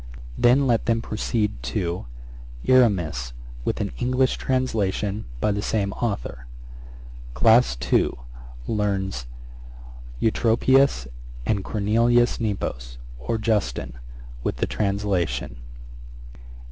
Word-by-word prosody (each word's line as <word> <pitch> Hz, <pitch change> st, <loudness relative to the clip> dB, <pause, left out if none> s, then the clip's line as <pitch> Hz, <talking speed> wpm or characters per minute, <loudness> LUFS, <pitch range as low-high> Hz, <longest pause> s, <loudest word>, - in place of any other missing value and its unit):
Then 125 Hz, -, +4 dB
let 120 Hz, -3 st, +1 dB
them 115 Hz, -1 st, +3 dB
proceed 105 Hz, -, -2 dB
to: 85 Hz, +5 st, -3 dB, 0.6 s
'Erasmus, 85 Hz, -, +3 dB, 0.3 s
with -, -, -1 dB
an -, -, -2 dB
English 130 Hz, +1 st, +1 dB
translation, 110 Hz, -5 st, -1 dB
by 105 Hz, -, +1 dB
the 100 Hz, 0 st, -1 dB
same 100 Hz, -2 st, 0 dB
authour. 60 Hz, -, -3 dB, 0.9 s
'Class 110 Hz, -, +5 dB, 0.2 s
II. -, -, +4 dB, 0.6 s
Learns 95 Hz, -, -1 dB, 0.9 s
Eutropius 115 Hz, -, +3 dB, 0.4 s
and 100 Hz, +6 st, 0 dB
Cornelius 115 Hz, +4 st, +2 dB
Nepos, -, -, -3 dB, 0.2 s
or 115 Hz, -, -2 dB
Justin, 100 Hz, -, -1 dB, 0.5 s
with -, -, -1 dB
the -, -, 0 dB
translation. 100 Hz, -, -1 dB
105 Hz, 95 wpm, -24 LUFS, 85-115 Hz, 0.9 s, Class